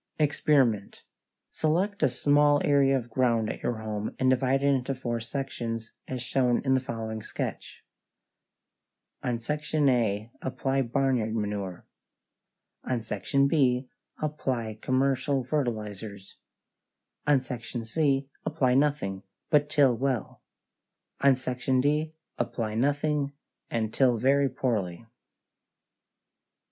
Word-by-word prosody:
=EXPERIMENT= 140 Hz, -8 st, +2 dB, 0.5 s
Select 185 Hz, +6 st, 0 dB
a -, -, +4 dB
small 145 Hz, +3 st, +4 dB
area 140 Hz, -2 st, +4 dB
of 120 Hz, -2 st, -6 dB
ground 115 Hz, -3 st, +2 dB
at -, -, -12 dB
your 115 Hz, -2 st, -2 dB
home 110 Hz, -1 st, -4 dB
and 130 Hz, 0 st, +3 dB
divide 130 Hz, +1 st, +2 dB
it 140 Hz, 0 st, +4 dB
into 135 Hz, +1 st, -1 dB
four 120 Hz, -2 st, -2 dB
sections, 115 Hz, -2 st, -4 dB, 0.2 s
as 125 Hz, -2 st, -4 dB
shown 125 Hz, -1 st, +2 dB
in 130 Hz, -, +3 dB
the 130 Hz, -, +4 dB
following 115 Hz, -4 st, -5 dB
sketch: -, -, -6 dB, 1.4 s
On 120 Hz, -1 st, -1 dB
Section 150 Hz, +4 st, 0 dB
A 110 Hz, -3 st, +1 dB
apply 135 Hz, +1 st, -1 dB
barnyard 125 Hz, -3 st, 0 dB
manure; 100 Hz, -4 st, -3 dB, 1.0 s
on 125 Hz, -3 st, -2 dB
Section 115 Hz, +6 st, +1 dB
B 130 Hz, -4 st, +2 dB, 0.3 s
apply 125 Hz, -8 st, -2 dB
commercial 135 Hz, +1 st, +1 dB
fertilizers; 110 Hz, -7 st, -4 dB, 0.9 s
on 145 Hz, -2 st, +5 dB
Section 120 Hz, -2 st, -6 dB
C 135 Hz, +2 st, +1 dB, 0.2 s
apply 145 Hz, -5 st, +1 dB
nothing, 135 Hz, -9 st, +1 dB, 0.3 s
but 150 Hz, -1 st, +4 dB
till 140 Hz, -5 st, +4 dB
well; 130 Hz, -3 st, -2 dB, 0.8 s
on 140 Hz, -1 st, +5 dB
Section 130 Hz, 0 st, -1 dB
D 150 Hz, +3 st, +1 dB, 0.2 s
apply 110 Hz, -3 st, -2 dB
nothing, 145 Hz, +3 st, 0 dB, 0.4 s
and 110 Hz, -2 st, -1 dB
till 125 Hz, -3 st, +3 dB
very 135 Hz, +4 st, +3 dB
poorly. 105 Hz, -8 st, -2 dB
130 Hz, 115 wpm, -28 LUFS, 115-140 Hz, 1.4 s, on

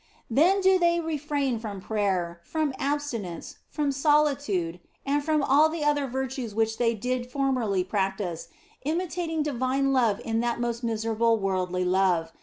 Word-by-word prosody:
Then 355 Hz, -, +4 dB
do 380 Hz, 0 st, +4 dB
they 340 Hz, -1 st, +3 dB
refrain 290 Hz, -6 st, -1 dB
from 210 Hz, -3 st, -6 dB
prayer, 185 Hz, -5 st, -1 dB
from 310 Hz, -, -1 dB
abstinence, 275 Hz, -, -3 dB
from 295 Hz, -2 st, -1 dB
solitude, 275 Hz, -, +1 dB, 0.3 s
and 285 Hz, +1 st, +1 dB
from 305 Hz, -1 st, +1 dB
all 290 Hz, +4 st, +5 dB
the 320 Hz, -1 st, -3 dB
other 290 Hz, -2 st, +2 dB
virtues 260 Hz, -3 st, -4 dB
which 225 Hz, 0 st, 0 dB
they 230 Hz, -1 st, +2 dB
did 250 Hz, +3 st, -2 dB
formerly 250 Hz, -8 st, 0 dB
practice, 190 Hz, -3 st, -2 dB, 0.3 s
imitating 325 Hz, 0 st, -2 dB
divine 270 Hz, 0 st, 0 dB
love 230 Hz, -6 st, +2 dB
in 225 Hz, 0 st, 0 dB
this 235 Hz, 0 st, 0 dB
most 235 Hz, 0 st, -2 dB
miserable 225 Hz, 0 st, +1 dB
worldly 185 Hz, -2 st, -1 dB
love. 180 Hz, -3 st, +2 dB
245 Hz, 145 wpm, -26 LUFS, 205-290 Hz, 0.3 s, all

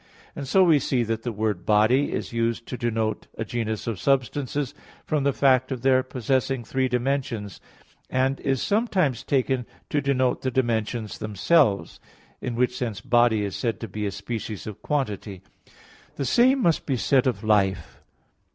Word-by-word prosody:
And 140 Hz, -, -5 dB
so 190 Hz, +7 st, +5 dB
we 165 Hz, -5 st, +5 dB
see 130 Hz, -3 st, 0 dB
that 115 Hz, 0 st, -2 dB
the 120 Hz, -, -3 dB
word 105 Hz, -4 st, -2 dB
"body" 110 Hz, +6 st, +3 dB
is -, -, -4 dB
used 115 Hz, 0 st, -1 dB
to -, -, -5 dB
denote 115 Hz, -3 st, -2 dB
a 115 Hz, -, -3 dB
genus 110 Hz, -2 st, -3 dB
of 115 Hz, -5 st, -3 dB
substances 135 Hz, +2 st, 0 dB, 0.3 s
from 150 Hz, -3 st, 0 dB
the 140 Hz, -, +4 dB
fact 130 Hz, -1 st, +3 dB
of 130 Hz, -2 st, -4 dB
their 130 Hz, -1 st, +4 dB
possessing 130 Hz, 0 st, -1 dB
three 130 Hz, +3 st, 0 dB
dimensions: 125 Hz, -5 st, -2 dB, 0.5 s
and 130 Hz, +1 st, +1 dB
is 135 Hz, -2 st, 0 dB
sometimes 195 Hz, -, +1 dB
taken 130 Hz, -2 st, 0 dB, 0.2 s
to 145 Hz, -, +1 dB
denote 130 Hz, -2 st, +1 dB
the 130 Hz, -, 0 dB
dimensions 115 Hz, -3 st, -1 dB
themselves; 105 Hz, -, +2 dB, 0.4 s
in 125 Hz, -2 st, -3 dB
which 125 Hz, +1 st, +1 dB
sense 115 Hz, -6 st, -3 dB
body 120 Hz, -2 st, +3 dB
is 100 Hz, -, -4 dB
said 115 Hz, -3 st, -2 dB
to 115 Hz, -, -4 dB
be 105 Hz, +1 st, -3 dB
a -, -, -2 dB
species 105 Hz, +1 st, -5 dB
of 105 Hz, -2 st, -8 dB
quantity. 105 Hz, -9 st, -3 dB, 0.7 s
The 140 Hz, -, -2 dB
same 255 Hz, -, +4 dB
must 165 Hz, -2 st, +1 dB
be 135 Hz, -3 st, +1 dB
said 130 Hz, +2 st, +2 dB
of 115 Hz, -5 st, -1 dB
life. 95 Hz, -5 st, +1 dB
125 Hz, 170 wpm, -25 LUFS, 110-135 Hz, 0.7 s, so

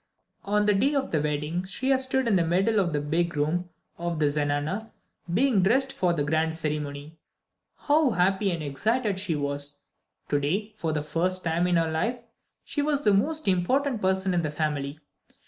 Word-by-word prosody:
On 210 Hz, +1 st, +2 dB
the 210 Hz, -, +5 dB
day 270 Hz, +9 st, +2 dB
of 270 Hz, -1 st, -1 dB
the 155 Hz, -, +1 dB
wedding, 150 Hz, +3 st, -1 dB
Shriya 260 Hz, +8 st, 0 dB
stood 260 Hz, -1 st, +1 dB
in 215 Hz, -, +3 dB
the 175 Hz, -, +3 dB
middle 190 Hz, +6 st, +2 dB
of 180 Hz, -3 st, +1 dB
the 150 Hz, -, 0 dB
big 165 Hz, +3 st, -1 dB
room 170 Hz, +5 st, 0 dB, 0.3 s
of 170 Hz, -1 st, -2 dB
the 155 Hz, -, +2 dB
zenana, 145 Hz, +8 st, -1 dB, 0.4 s
being 225 Hz, +1 st, +3 dB
dressed 265 Hz, +8 st, +2 dB
for 180 Hz, -2 st, +1 dB
the 160 Hz, -4 st, 0 dB
grand 160 Hz, +2 st, 0 dB
ceremony. 150 Hz, 0 st, -4 dB, 0.6 s
How 300 Hz, -1 st, +3 dB
happy 195 Hz, 0 st, +2 dB
and 170 Hz, -4 st, -2 dB
excited 205 Hz, -, 0 dB
she 190 Hz, -5 st, -1 dB
was! 145 Hz, 0 st, -2 dB, 0.5 s
To 145 Hz, -, +2 dB
day, 195 Hz, +10 st, -2 dB
for 165 Hz, -6 st, -2 dB
the 150 Hz, -1 st, -1 dB
first 180 Hz, +5 st, 0 dB
time 170 Hz, +2 st, +1 dB
in 180 Hz, -, +2 dB
her 165 Hz, -1 st, +1 dB
life, 230 Hz, +10 st, -1 dB, 0.4 s
she 290 Hz, -, -2 dB
was 290 Hz, -1 st, +1 dB
the 210 Hz, -7 st, +3 dB
most 310 Hz, +9 st, 0 dB
important 230 Hz, +7 st, +1 dB
person 190 Hz, 0 st, +1 dB
in 175 Hz, -, +2 dB
the 155 Hz, -, -2 dB
family. 150 Hz, -1 st, -2 dB
175 Hz, 185 wpm, -26 LUFS, 150-215 Hz, 0.6 s, the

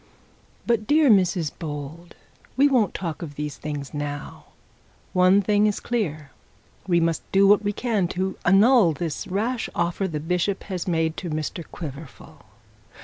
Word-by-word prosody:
But, 225 Hz, -3 st, 0 dB
dear 295 Hz, -3 st, +5 dB
Mrs 180 Hz, -5 st, +2 dB
Bold; 155 Hz, +2 st, -7 dB, 0.4 s
we 280 Hz, +2 st, +6 dB
won't 245 Hz, -9 st, +2 dB
talk 170 Hz, -3 st, -4 dB
of 150 Hz, -4 st, -7 dB
those 150 Hz, 0 st, -5 dB
things 145 Hz, -2 st, -6 dB
now. 145 Hz, 0 st, -6 dB, 0.7 s
One 185 Hz, +2 st, +4 dB
thing 210 Hz, +1 st, +3 dB
is 210 Hz, -, -1 dB
clear; 155 Hz, -, -3 dB, 0.6 s
we 175 Hz, -2 st, +3 dB
mustdo 165 Hz, +4 st, +2 dB
what 205 Hz, +1 st, +5 dB
we 205 Hz, -, 0 dB
can 210 Hz, -4 st, 0 dB
to 190 Hz, +1 st, -1 dB
annul 200 Hz, 0 st, +5 dB
this 155 Hz, 0 st, -4 dB
rash 225 Hz, +6 st, -2 dB
offer 170 Hz, +3 st, -1 dB
the 155 Hz, -4 st, -4 dB
bishop 180 Hz, +5 st, -1 dB, 0.2 s
made 160 Hz, -2 st, 0 dB
to 180 Hz, -, -5 dB
Mr 155 Hz, +2 st, -4 dB
Quiverful. 150 Hz, -3 st, -10 dB
175 Hz, 145 wpm, -24 LUFS, 155-205 Hz, 0.7 s, we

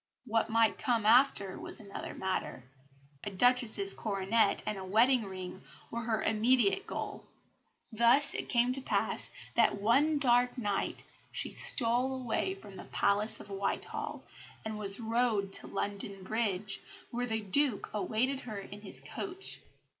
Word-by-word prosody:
What 225 Hz, -1 st, 0 dB
might 225 Hz, 0 st, +2 dB
come 230 Hz, -4 st, 0 dB
after 220 Hz, -5 st, +4 dB
was -, -, -4 dB
another 200 Hz, -2 st, -7 dB
matter. 190 Hz, -8 st, -3 dB, 0.6 s
A -, -, -3 dB
Duchess's 245 Hz, -, +4 dB
coronet 205 Hz, +1 st, +1 dB
and 210 Hz, -2 st, -3 dB
a -, -, -6 dB
wedding 225 Hz, +5 st, +3 dB
ring 185 Hz, -1 st, -8 dB, 0.3 s
were 235 Hz, -, -3 dB
her 225 Hz, -1 st, -1 dB
immediate 235 Hz, -, +2 dB
goal. -, -, -6 dB, 0.6 s
Thus 235 Hz, +5 st, +4 dB
it -, -, -5 dB
came 245 Hz, 0 st, +3 dB
to 270 Hz, -, +2 dB
pass -, -, 0 dB, 0.2 s
that 230 Hz, -3 st, +3 dB
one 275 Hz, +9 st, +3 dB
dark 245 Hz, -2 st, +3 dB
night 205 Hz, -5 st, -2 dB, 0.3 s
she -, -, -1 dB
stole 260 Hz, -, +2 dB
away 255 Hz, +10 st, -1 dB
from 200 Hz, -, -12 dB
the -, -, -9 dB
Palace 210 Hz, +2 st, +1 dB
of 205 Hz, -, -11 dB
Whitehall, 195 Hz, 0 st, -4 dB, 0.4 s
and 215 Hz, -1 st, -4 dB
was 200 Hz, 0 st, -3 dB
rowed 225 Hz, -4 st, 0 dB
to -, -, -1 dB
London 200 Hz, -1 st, -4 dB
Bridge, 205 Hz, -1 st, -2 dB, 0.3 s
where 245 Hz, +1 st, -2 dB
the 220 Hz, -1 st, -1 dB
Duke 235 Hz, +3 st, +3 dB
awaited 230 Hz, +6 st, 0 dB
her 220 Hz, -6 st, -7 dB
in 200 Hz, +1 st, -9 dB
his 200 Hz, -, -3 dB
coach. 385 Hz, 0 st, -4 dB
225 Hz, 145 wpm, -31 LUFS, 200-245 Hz, 0.6 s, after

